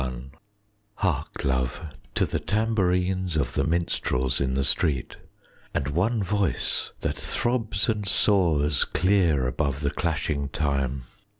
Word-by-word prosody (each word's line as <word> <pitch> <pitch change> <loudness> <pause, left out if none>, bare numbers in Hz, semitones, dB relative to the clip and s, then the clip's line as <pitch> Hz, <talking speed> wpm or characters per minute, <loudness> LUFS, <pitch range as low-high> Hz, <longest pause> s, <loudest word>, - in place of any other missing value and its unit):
LXXXI 65 0 -5 0.6
Hark, 80 -7 -2
love, 65 -1 0 0.4
to - - +3
the - - -2
tambourines 95 -5 0
Of 75 - -1
the 70 - +1
minstrels 80 -6 0
in 65 -1 0
the 70 - +1
street, 65 0 +1 0.6
And 70 - 0
one 100 +8 +1
voice 100 -1 -1
that - - -1
throbs 115 -4 -1
and 105 -3 -1
soars 80 -9 +3
Clear 85 -7 +2
above 70 +2 -1
the 70 - 0
clashing 75 -4 -1
time! 70 -3 -1
80 Hz, 125 wpm, -26 LUFS, 70-95 Hz, 0.6 s, to